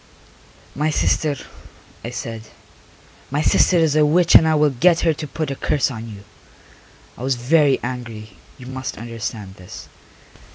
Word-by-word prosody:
"My 150 +2 0
sister," 150 -1 +1 0.7
I 120 - -5
said. 115 -3 -7 0.8
"My 145 +3 -1
sister 180 - +4
is 160 -3 +2
a 155 - +4
witch 170 +3 +3
and 160 - +8
I 160 - +3
will 150 -1 +3
get 165 +7 +3
her 165 - +2
to 150 0 -7
put 155 -1 -4
a - - -3
curse 140 0 0
on 115 -1 -7
you." 100 -2 -11 1.0
I - - -9
was 130 0 0
very 140 +3 +3
angry, 120 -3 -6 0.3
you 125 - -12
must 130 0 -6
understand 110 -3 -6
this. 90 0 -11
130 Hz, 160 wpm, -20 LUFS, 115-155 Hz, 1.0 s, and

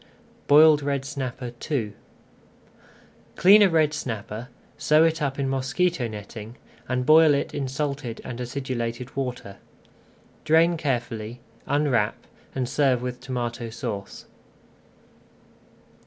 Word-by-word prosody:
BOILED 150 +1 +7
RED 140 -1 -2
SNAPPER 130 -3 -5 0.2
II 115 -9 -1 1.4
Clean 200 +4 +7
a 200 - +6
red 155 -3 +2
snapper, 115 -4 -5 0.3
sew 155 +1 +4
it 165 -1 +1
up 140 -2 -1
in 140 -1 -1
mosquito 135 +2 0
netting, 110 +1 -9 0.3
and 125 0 0
boil 155 0 +6
it 140 - -2
in 140 -2 -2
salted 135 -3 -3
and 125 -1 -6
acidulated 125 -1 -4
water. 125 -7 -4 0.9
Drain 165 +2 +4
carefully, 120 -6 -3 0.3
unwrap, 140 -8 +1 0.4
and 130 -2 -1
serve 130 -2 +1
with 125 0 -4
Tomato 120 -2 -4
Sauce. 110 -4 -6
130 Hz, 110 wpm, -25 LUFS, 120-145 Hz, 1.4 s, BOILED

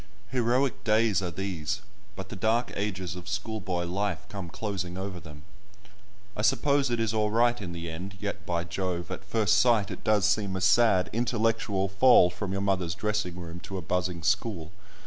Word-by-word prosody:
Heroic 125 +1 +1
days 110 -2 +3
are 90 - -2
these, 95 +1 -3 0.3
but 95 0 -7
the - - -6
dark 110 +5 +1
ages 95 -4 -3
of 90 +2 -8
schoolboy 100 -4 -2
life 95 0 -2
come 95 -4 -6
closing 90 -2 -4
over 95 -1 -5
them. 75 -4 -12 0.9
I - - -2
suppose 140 +5 +3
it 120 -1 0
is 115 -1 0
all 105 -1 +1
right 120 +1 +2
in 90 -3 -5
the 85 0 -6
end, 90 +5 -6
yet, 100 0 -4
by 85 -1 -1
Jove, 85 0 -3
at 95 - -5
first 105 +1 +2
sight 115 -4 +3
it - - -7
does 105 -3 +3
seem 105 -2 +1
a 95 - -3
sad 95 -1 +4
intellectual 115 -4 +1
fall 100 -2 +6
from 95 +1 -4
your 95 0 -1
mother's 95 -4 0
dressing 105 -4 -1
room 85 0 -7
to 95 +2 -6
a 90 - -5
buzzing 90 0 -1
school. 95 -3 0
100 Hz, 185 wpm, -28 LUFS, 90-110 Hz, 0.9 s, fall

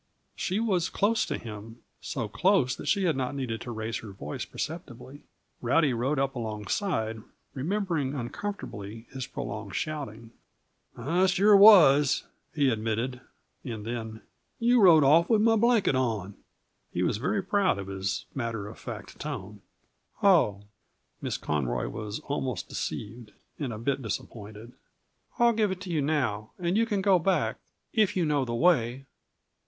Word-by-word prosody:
She 190 +3 -1
was 190 -6 +1
close 220 +3 +1
to - - -2
him 110 +1 -10 0.2
so 120 -6 -3
close 170 - +2
that - - -8
she 200 - +2
had 170 -4 +2
not 130 +1 -2
needed 120 -5 -3
to 120 - -6
raise 110 0 -3
her 110 - -9
voice 75 -6 -6
perceptibly. 145 -4 -7 0.4
Rowdy 135 +3 +3
rode 130 +6 0
up 135 0 0
alongside, 110 - -2 0.3
remembering 160 -2 -1
uncomfortably 120 - -6
his 130 -2 -5
prolonged 100 -1 -6
shouting. 115 -8 -4 0.7
"I 170 +10 +2
sure 200 +3 +5
was," 150 -9 +7 0.3
he 140 -3 +3
admitted. 115 +3 -2 0.4
And 110 -5 -6
then: 110 -1 -5 0.3
"You 240 0 +4
rode 165 -6 +7
off 160 +5 +5
with 220 - +4
my 225 0 +5
blanket 230 - +3
on." 110 -7 -1 0.6
He - - -1
was - - +1
very 195 - -1
proud 195 - +2
of 100 - -5
his 95 0 -3
matter 115 -5 -3
of 105 - -11
fact 110 -3 -8
tone. 105 -9 -6 0.6
"Oh!" 155 - +4 0.6
Miss - - -2
Conroy 65 -5 -1
was 105 0 -5
almost 130 -8 -3
deceived, 105 0 -5 0.3
and 140 -5 -2
a 110 - -5
bit 135 +5 -1
disappointed. 110 0 -6 0.7
"I'll 235 -1 +5
give 215 -2 +2
it 190 -1 -4
to 185 -2 -6
you 155 -3 +1
now, 130 -8 -1
and 175 0 -1
you 230 +1 +3
can 205 -3 -1
go 190 -3 +5
back 185 +2 0 0.3
if 210 -4 +2
you 175 - +2
know 145 -3 +1
the 120 -1 -3
way." 130 -4 +2
135 Hz, 155 wpm, -28 LUFS, 110-180 Hz, 0.7 s, was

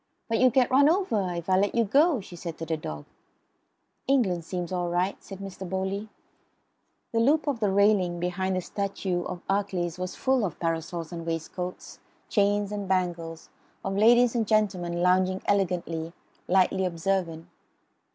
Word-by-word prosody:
"But 225 - 0
you'll 255 - +6
get 250 +1 +2
run 280 +3 +6
over 230 - +1
if 170 -1 -5
I 185 0 +4
let 200 +1 +1
you 235 - +4
go," 280 - +3
she 185 - -11
said 170 -1 -6
to 165 - -5
the 160 0 -1
dog. 75 - -7 1.0
"England 195 -12 +2
seems 180 0 -4
all 175 -1 -1
right," 180 +3 0
said 195 - -9
Mr. 190 -1 -7
Bowley. 190 +3 -2 1.0
The 230 - +1
loop 290 +7 +3
of 280 -6 -1
the 210 -3 +2
railing 195 -3 +3
beneath 180 +2 -1
the 185 - 0
statue 195 -2 -2
of 175 - -5
Achilles 190 -4 -1
was 185 0 -4
full 260 -3 +1
of 180 -6 -3
parasols 165 0 -3
and 170 -1 -5
waistcoats; 165 +2 -5 0.3
chains 205 -1 +2
and 205 -2 -4
bangles; 170 -3 -2 0.4
of 195 0 -1
ladies 235 +3 +5
and 230 -3 0
gentlemen, 180 -5 +1
lounging 185 +1 +2
elegantly, 170 -4 -1 0.3
lightly 190 0 +3
observant. 170 -1 -1
190 Hz, 160 wpm, -27 LUFS, 175-205 Hz, 1.0 s, you'll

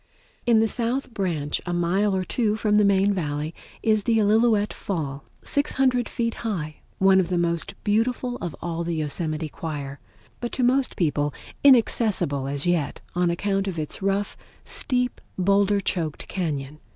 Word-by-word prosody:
In 230 -2 +5
the 225 - +3
south 240 +3 -2
branch, 165 -8 -1
a 175 - -3
mile 190 +4 +1
or 185 - 0
two 215 +3 0
from 210 -1 +2
the 210 - +5
main 200 0 +3
Valley, 150 -3 -2 0.3
is 215 -1 +3
the 225 +2 +2
Illilouette 215 0 +3
Fall, 145 -7 -4 0.2
600 260 -4 +1
feet 230 -1 -1
high, 165 -10 -3 0.2
one 190 0 +5
of 180 -2 0
the 180 - 0
most 170 -1 -1
beautiful 245 +3 0
of 170 -5 -5
all 170 0 -2
the 170 0 -2
Yosemite 155 +1 -2
choir, 145 -3 -6 0.4
but 240 - -4
to 255 - 0
most 255 +2 +2
people 145 -5 0 0.3
inaccessible 220 - +4
as 140 0 -1
yet 175 -5 0
on 180 0 +2
account 195 +3 0
of 185 -3 -3
its 155 +3 -4
rough, 195 +1 0 0.3
steep, 250 -1 +1 0.2
boulder 200 +2 +3
choked 165 -6 -3
cañon. 150 -6 -3
190 Hz, 160 wpm, -24 LUFS, 160-220 Hz, 0.4 s, In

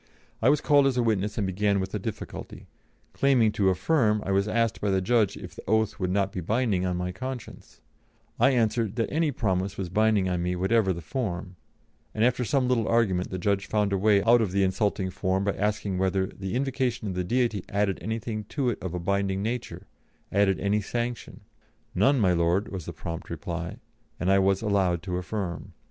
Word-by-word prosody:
I 115 - +5
was 145 +1 +3
called 145 -2 +4
as 130 -2 +1
witness 105 -3 0
and 105 - 0
began 100 +2 +1
with 95 0 -4
a 105 - -1
difficulty; 110 +2 -7 0.5
claiming 130 -6 +3
to 100 -2 +2
affirm, 105 - +2
I 100 - -1
was 100 +1 +2
asked 115 0 0
by 100 - 0
the 95 -1 +2
judge 105 +1 +2
if 90 -3 -9
the - - -10
oath 110 0 +1
would 90 -2 -1
not 100 +1 +1
be 90 - -4
binding 100 -1 0
on 90 -1 -1
my 90 0 -2
conscience; 130 +4 -8 0.6
I 125 +4 +6
answered 115 -4 +1
that 115 -2 -1
any 160 +1 +1
promise 95 -6 -1
was 95 -3 -3
binding 105 0 +2
on 90 -1 -1
me 90 +1 -1
whatever 95 +2 +2
the 85 -2 -5
form, 90 - -4 0.6
and 110 +1 +3
after 125 0 +1
some 130 +2 +1
little 120 -3 +1
argument 100 -6 +1
the 95 - -4
judge 100 +2 0
found 105 -2 +1
a - - +2
way 100 -1 +4
out 120 +1 +5
of 105 -5 0
the 100 0 +3
insulting 95 0 0
form 95 +1 -1
by 100 0 0
asking 105 -2 -1
whether 95 0 +1
the 95 +2 -6
"invocation 130 -4 -1
of 95 - -3
the 90 0 -1
Deity 115 -1 0
added 100 -1 0
anything 110 -1 -4
to 130 +2 -1
it - - -6
of 90 -1 -4
a - - -2
binding 100 +2 0
nature 120 +2 -4 0.5
added 95 -3 +2
any 100 +3 +1
sanction?" 120 +3 -4 0.5
"None, 125 +9 +3
my 95 -5 +3
Lord," 85 +5 +1
was 95 -5 -5
the - - -5
prompt 85 +1 -6
reply, 85 -1 -5 0.4
and 90 +1 +1
I 100 - +5
was 95 +1 +2
allowed 95 -5 +1
to 90 -1 -3
affirm. 90 -3 -4
100 Hz, 205 wpm, -27 LUFS, 95-115 Hz, 0.6 s, I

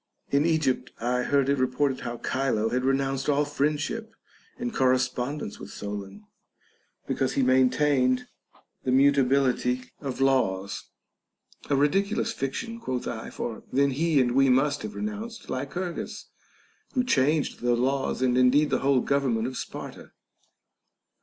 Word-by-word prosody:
In 140 +3 +3
Egypt 155 -6 +1
I 125 +2 0
heard 140 +1 +2
it 140 -1 +1
reported 130 +1 +1
how 120 0 -5
Chilo 125 -5 0
had 125 +2 -1
re 135 +1 +3
nounced 135 0 -2
all 145 +1 +2
friendship 150 +10 -2 0.4
and 240 -1 -4
correspondence 130 -1 0
with - - -9
Solon, 100 0 -7 0.8
because 135 0 -1
he 135 - +1
maintained 130 0 +3 0.6
the 130 - 0
mutability 130 -2 +2
of 135 -3 -5
laws. 100 -8 +1 0.8
A 140 - +3
ridicu 195 +10 +2
lous - - -1
fiction, 230 - -4
quoth 130 - -3
I, 110 - -5
for 115 -2 -5
then 140 +1 +3
he 155 +2 +2
and 125 -2 +2
we 135 +2 +4
must 140 +3 +2
have 215 - -6
re - - -4
nounced 220 +2 -6
Lycurgus, 170 +7 -4 0.7
who 250 - +3
changed 150 - +1
the 120 0 +2
laws 135 +1 0
and 125 0 +3
indeed 140 +4 +4
the - - +2
whole 135 -2 +3
government 130 -5 +1
of 130 +1 -4
Sparta. - - -7
135 Hz, 145 wpm, -26 LUFS, 125-145 Hz, 0.8 s, we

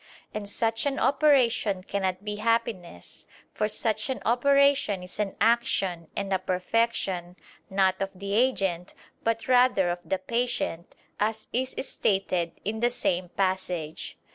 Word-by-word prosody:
And 210 -1 -4
such 225 +4 0
an 280 - -1
operation 250 -9 +3
cannot 190 0 -2
be 210 0 -3
happiness: 220 - -2 0.3
for 210 - 0
such 215 +1 -1
an 265 - -2
operation 275 -5 +3
is 180 - -10
an 205 -2 -1
action 195 -7 +1
and 200 -1 -2
a 190 - +2
perfection, 185 -1 -1 0.3
not 190 -1 +2
of 195 - 0
the 200 +2 -5
agent, 195 -7 +1 0.3
but 230 0 -1
rather 245 -8 +4
of 175 - -3
the 190 +3 -1
patient, 190 -5 -2 0.2
as 215 +1 -1
is 255 +2 -1
stated 185 -4 0
in 220 +2 -2
the 240 +1 +3
same 180 -7 -1
passage. 185 -5 -2
205 Hz, 140 wpm, -27 LUFS, 185-235 Hz, 0.3 s, rather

